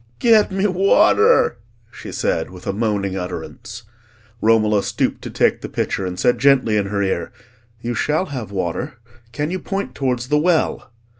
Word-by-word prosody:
get 220 -4 +4
me 190 +1 0
water!" 200 - +4 0.3
she - - -9
said, - - -1
with 90 0 -12
a - - -1
moaning 100 -3 -1
utterance. 90 +3 -7 0.6
Romola 110 -2 +3
stooped - - -2
to - - -7
take - - +1
the - - -6
pitcher, 95 - -2
and 90 0 -6
said 125 - +2
gently 130 -5 +3
in 100 -2 +1
her 100 0 -1
ear, 95 - -2 0.5
"You 120 +1 -3
shall 150 +8 0
have 130 - -6
water; 100 - -3 0.4
can 145 +6 -3
you 185 - -2
point 195 +2 -4
towards 125 -2 -2
the 150 0 +3
well?" 165 -6 0
120 Hz, 165 wpm, -20 LUFS, 100-165 Hz, 0.6 s, get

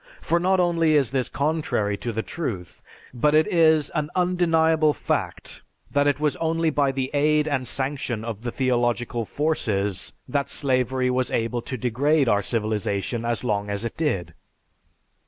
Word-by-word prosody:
For 170 - +1
not 185 +2 +2
only 165 -3 +3
is 135 -6 +2
this 130 -2 0
contrary 140 -9 -1
to 120 - -4
the 110 0 -3
truth, 100 - -5 0.3
but 150 +5 +2
it 155 0 +5
is 160 -3 +3
an 150 0 -2
undeniable 165 -4 +3
fact - - -3 0.3
that 145 0 +2
it 145 -1 +1
was 150 -2 +1
only 165 0 0
by 140 -2 +2
the 130 -1 -3
aid 150 +1 +2
and 135 -4 -1
sanction 130 -4 -2
of 110 -3 -5
the 120 - -3
theological 120 -2 0
forces 105 - -1
that 140 -1 -1
slavery 130 -2 0
was 125 0 0
able 115 +1 -1
to 130 - -5
degrade 135 +5 +1
our 105 -2 +3
civilization 110 +1 -1
as 120 +1 0
long 105 -4 -1
as 100 +2 -2
it 115 - -4
did. 145 - -1
135 Hz, 160 wpm, -24 LUFS, 115-155 Hz, 0.3 s, it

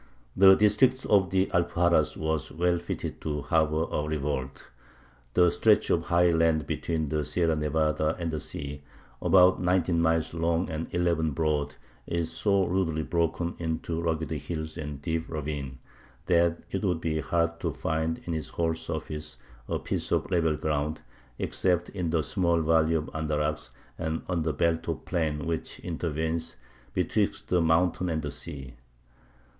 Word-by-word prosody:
The 95 0 +8
district 115 +6 +3
of 100 -3 +4
the 95 0 +2
Alpuxarras 85 -2 +2
was 80 -1 -2
well 85 +1 +1
fitted 85 - -5
to 75 -2 -3
harbour 80 -2 +2
a - - 0
revolt. 75 -3 -3 0.7
The 90 -1 +5
stretch - - +3
of - - +1
high 85 0 +4
land 80 -2 +2
between 80 -3 -2
the 75 0 0
Sierra 80 +2 +1
Nevada 75 +1 +1
and 85 -2 -2
the 80 - -2
sea, 70 0 -6 0.4
about 95 -1 +5
nineteen 90 -2 +2
miles 80 -1 +1
long 85 +1 0
and 80 +1 -4
eleven 85 -2 +1
broad, 75 -1 0 0.3
is 85 -1 -1
"so 95 +3 +2
rudely 85 -4 0
broken 85 +1 0
into 80 0 -2
rugged 80 -3 -1
hill 80 -2 -3
and 75 -3 -5
deep 80 +1 -2
ravine, 70 -4 -4 0.5
that 85 -1 +2
it 95 - -1
would 90 -4 +1
be 80 -1 -1
hard 85 +3 0
to - - -1
find 80 +1 -2
in 85 - -2
its 80 -2 -3
whole 80 -1 0
surface 75 -2 -5 0.3
a - - -1
piece - - -3
of - - 0
level 80 -3 +2
ground, 75 0 -1 0.4
except 90 -2 0
in 90 -4 -3
the 80 -1 +1
small 85 -2 +1
valley 80 0 +3
of 75 -1 0
Andarax 75 -1 -1 0.3
and 80 -1 -2
on 90 -3 0
the 80 0 0
belt 85 +2 0
of - - -3
plain 80 -5 -1
which 80 -1 -3
intervenes 80 -1 -2 0.4
betwixt - - -1
the 90 -1 +3
mountains 85 +2 +2
and 80 -1 -1
the 75 - -3
sea. 70 -6 -7
80 Hz, 160 wpm, -28 LUFS, 75-85 Hz, 0.7 s, The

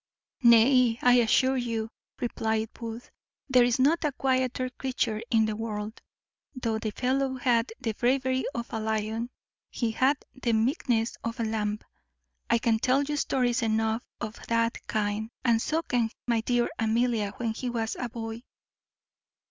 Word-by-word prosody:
"Nay, 235 0 +6
I 245 0 +6
assure 260 +3 +3
you," 230 -2 -2 0.3
replied 220 -2 -1
Booth, 230 0 -8 0.4
"there 255 -3 +5
is 240 +1 +2
not 295 +7 +3
a 300 - +1
quieter 255 -1 0
creature 245 -4 -2
in 225 -2 +4
the 215 -1 -2
world. 215 0 -5 0.5
Though 230 -3 -1
the 220 - -2
fellow 260 +4 0
hath 245 -2 +2
the 230 -4 -2
bravery 260 +3 +1
of 235 0 -5
a 225 - -1
lion, 220 +2 -2 0.4
he 235 -2 -1
hath 265 +5 +2 0.2
the 250 -3 -1
meekness 230 0 +1
of 230 +2 -4
a - - +1
lamb. 210 -1 -1 0.7
I - - +4
can 230 -1 +1
tell 260 +4 +2
you 295 +1 -2
stories 255 -3 +1
enow 220 0 +1 0.2
of 215 +1 -6
that 230 0 0
kind, 215 0 -1 0.2
and 230 -2 +3
so 320 +6 0
can 240 -6 0 0.2
my 230 -2 +2
dear 240 +1 +1
Amelia, 225 -2 +1
when 230 -2 -1
he 250 +2 -4
was 225 -2 -2
a 245 - -3
boy." 225 -1 -6
235 Hz, 155 wpm, -28 LUFS, 225-255 Hz, 0.7 s, Nay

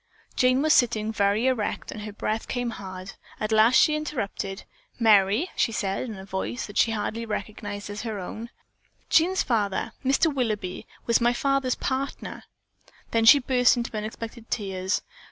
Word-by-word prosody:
Jane 255 +2 +3
was 310 0 +4
sitting 220 -3 +2
very 205 +2 +2
erect 255 -5 -1
and 210 - -7
her 210 0 -6
breath 215 +2 -3
came 245 -2 -2
hard. 185 -2 -8 0.3
At 215 +1 -2
last 220 +3 +5
she 305 - +6
interrupted. 225 -10 -4 0.4
"Merry," 215 - +4
she - - +1
said 200 -4 -2
in 220 - -6
a 190 - -9
voice 195 +5 -3
she - - +4
could - - -1
hardly 220 +2 -3
recognize 205 -1 -5
as 205 +1 -6
her 220 -3 -4
own, 220 +5 -7 0.6
"Jean's 360 +4 +4
father, 215 -2 0
Mr. 275 +4 +2
Willoughby, 215 -8 -2 0.2
was 235 0 +3
my 240 +1 +3
father's 275 0 +1
partner." 270 +1 -4 0.7
Then 225 -1 +2
she 285 - +10
burst 250 -2 +3
into 235 -1 -3
unexpected 225 +2 -6
tears. 190 -3 -2
225 Hz, 160 wpm, -26 LUFS, 205-250 Hz, 0.7 s, she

